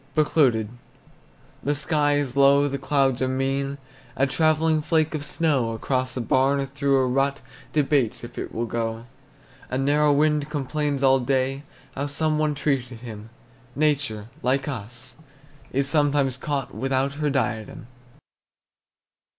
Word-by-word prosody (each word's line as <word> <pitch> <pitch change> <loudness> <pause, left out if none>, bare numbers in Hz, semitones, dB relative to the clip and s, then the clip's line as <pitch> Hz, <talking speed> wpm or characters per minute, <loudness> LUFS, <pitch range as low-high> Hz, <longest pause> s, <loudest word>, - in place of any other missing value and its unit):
BECLOUDED. 135 -8 +3 1.0
The 145 +1 0
sky 145 0 +1
is 145 -3 -1
low, 140 +1 +5
the 140 0 -3
clouds 135 -2 +1
are 130 - +2
mean, 135 +1 -1 0.4
A 135 - +2
travelling 155 +2 +2
flake 160 0 +1
of 150 -2 -3
snow 145 -7 0
Across 130 +3 -2
a - - -1
barn 135 +4 +2
or 135 - -1
through 140 0 +1
a 130 - +3
rut 135 +2 0 0.3
Debates 140 -7 +1
if 120 0 -9
it - - -5
will 115 - -2
go. 115 0 -3 0.6
A 130 - -2
narrow 145 +2 +3
wind 150 0 +2
complains 145 -1 -2
all 135 0 +5
day 135 +1 0 0.3
How 140 +2 -3
some 155 +2 0
one 155 -1 +1
treated 130 -5 -2
him; 110 -2 -9 0.5
Nature, 140 -8 0
like 135 +2 0
us, 125 -1 -7 0.5
is 140 +1 0
sometimes 145 -3 +2
caught 135 0 -3
Without 135 +1 -1
her 150 - +2
diadem. 120 -6 -2
135 Hz, 140 wpm, -24 LUFS, 130-145 Hz, 1.0 s, low